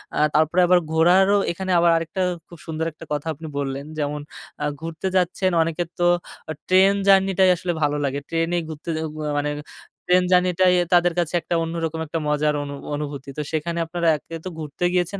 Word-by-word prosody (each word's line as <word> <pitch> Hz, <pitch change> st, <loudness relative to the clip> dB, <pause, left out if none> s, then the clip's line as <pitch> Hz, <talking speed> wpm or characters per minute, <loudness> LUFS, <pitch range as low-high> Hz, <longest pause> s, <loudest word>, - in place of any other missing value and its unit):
আ -, -, -3 dB, 0.2 s
তারপরে 160 Hz, +4 st, +3 dB
আবার 180 Hz, 0 st, +5 dB
ঘোরারও 185 Hz, +5 st, +4 dB
এখানে 185 Hz, +2 st, -4 dB
আবার 170 Hz, 0 st, +4 dB
আরেকটা 165 Hz, +3 st, -3 dB, 0.3 s
খুব 170 Hz, -, -13 dB
সুন্দর 160 Hz, 0 st, -2 dB
একটা -, -, -12 dB
কথা 145 Hz, +2 st, -3 dB
আপনি 160 Hz, +2 st, -9 dB
বললেন 140 Hz, 0 st, -3 dB
যেমন 150 Hz, 0 st, -2 dB, 0.4 s
আ -, -, +1 dB, 0.2 s
ঘুরতে 165 Hz, +3 st, -4 dB
যাচ্ছেন 185 Hz, +1 st, +1 dB
অনেকের 165 Hz, +1 st, -1 dB
তো 175 Hz, -, +2 dB, 0.5 s
আ -, -, -2 dB
ট্রেন 190 Hz, +2 st, +5 dB
জার্নি 195 Hz, 0 st, +5 dB
টাই 190 Hz, -1 st, +6 dB
আসলে 180 Hz, 0 st, -3 dB
ভালো 150 Hz, 0 st, +1 dB
লাগে। 140 Hz, 0 st, -1 dB
ট্রেন 165 Hz, 0 st, 0 dB
এ -, -, +2 dB
ঘুরতে 155 Hz, +1 st, -8 dB
যে 160 Hz, -, -2 dB, 0.2 s
উয়া 150 Hz, -1 st, -3 dB
মানে 145 Hz, 0 st, 0 dB, 0.6 s
ট্রেন 180 Hz, 0 st, +4 dB
জার্নি 180 Hz, 0 st, +4 dB
টাই 185 Hz, -1 st, +5 dB, 0.2 s
তাদের 175 Hz, 0 st, +4 dB
কাছে 170 Hz, -1 st, -1 dB
একটা 170 Hz, -, -2 dB
অন্যরকম 165 Hz, -1 st, -3 dB
একটা 160 Hz, +2 st, -3 dB
মজার 150 Hz, 0 st, +1 dB
অনু 140 Hz, 0 st, -6 dB, 0.2 s
অনুভূতি। 145 Hz, -2 st, -6 dB
তো -, -, -1 dB
সেখানে 170 Hz, +2 st, -2 dB
আপনারা 170 Hz, +1 st, -2 dB
একে 165 Hz, -, -10 dB
তো -, -, -3 dB
ঘুরতে 150 Hz, +2 st, -6 dB
গিয়েছেন 180 Hz, +2 st, 0 dB
165 Hz, 195 wpm, -22 LUFS, 150-180 Hz, 0.6 s, টাই